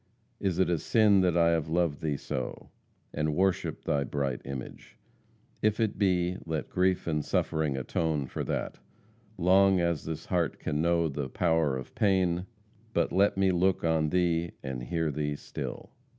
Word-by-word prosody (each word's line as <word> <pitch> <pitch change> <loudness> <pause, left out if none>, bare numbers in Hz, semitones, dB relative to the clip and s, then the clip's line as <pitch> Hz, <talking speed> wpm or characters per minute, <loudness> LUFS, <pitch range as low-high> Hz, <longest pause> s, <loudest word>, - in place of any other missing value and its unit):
Is 95 -4 -1
it 95 - +3
a 85 -2 +1
sin 105 -1 +4
that 90 -2 +2
I 85 -1 +5
have 80 -2 0
loved 85 -3 0
thee 75 -3 -1
so, 65 -2 -5 0.4
And 75 0 -1
worshiped 95 0 0
thy 70 -1 +1
bright 70 -2 -2
image? 70 -2 -8 0.6
If 110 +1 +1
it 110 -4 0
be, 90 -2 +2
Let 80 -2 -4
grief 90 0 +1
and 75 -3 -1
suffering 75 -3 0
atone 75 +2 -1
for - - -4
that, - - -3 0.6
Long 95 +1 +4
as 85 -4 0
this 80 0 -5
heart 85 -4 0
can 75 -1 -2
know 85 0 +2
the 70 -2 -4
power 80 -4 +1
of 65 - -8
pain, 95 -3 +1 0.5
But - - +2
let 95 +1 +3
me 95 -1 +3
look 90 +2 +1
on 80 -2 +2
thee 85 -1 +1
and 65 -2 -4
hear 80 +5 -1
thee 75 0 -2
still." - - -7
85 Hz, 165 wpm, -29 LUFS, 75-90 Hz, 0.6 s, I